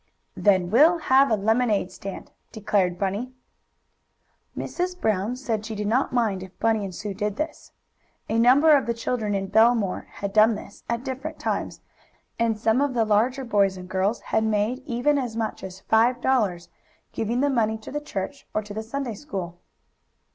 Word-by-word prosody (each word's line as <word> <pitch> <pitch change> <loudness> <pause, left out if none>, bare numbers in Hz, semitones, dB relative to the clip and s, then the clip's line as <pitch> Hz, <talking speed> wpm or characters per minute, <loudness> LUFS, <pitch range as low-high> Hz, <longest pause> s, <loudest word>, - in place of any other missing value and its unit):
"Then 185 -3 +2
we'll 310 +9 +6
have 275 -3 +4
a 220 - +3
lemonade 215 -2 +1
stand," 195 +1 -8 0.2
decided 200 -5 0
Bunny. 205 +7 -2 1.2
Mrs. 360 0 -3
Brown 215 - 0
said 230 -5 -3
she 220 0 -6
did 210 0 -3
not 240 +6 +1
mind 220 -6 0
if 190 0 -11
Bunny 225 -2 +1
and 190 -2 -6
Sue 210 +1 -5
did 205 +1 -2
this. 310 +6 -5 0.6
A 225 - 0
number 280 +6 +6
of 275 - +1
the 235 - 0
children 225 -3 -2
in 195 0 -1
Bellemere 220 -2 +3
had 200 -1 -5
done 220 +1 +5
this, 200 - -11
at 235 +1 -1
different 270 +3 -5
times, - - -3 0.6
and 230 -2 +1
some 225 +4 +2
of 285 -3 0
the 230 -2 +2
larger 240 +6 +1
boys 200 -4 +2
and 180 0 -9
girls 190 +4 0
had 220 - 0
made 220 +3 0
even 280 +3 +1
as 240 -4 -4
much 220 -1 -3
as 190 0 -8
five 235 +4 +3
dollars, 210 -10 0 0.4
giving 230 +3 -1
the 285 - +2
money 220 -3 +1
to 220 - -10
the 295 - -3
church, 275 +2 -6
or 215 - 0
to 205 0 -9
the 215 - -3
Sunday 245 +2 -4
school. 190 - -6
220 Hz, 180 wpm, -24 LUFS, 205-250 Hz, 1.2 s, we'll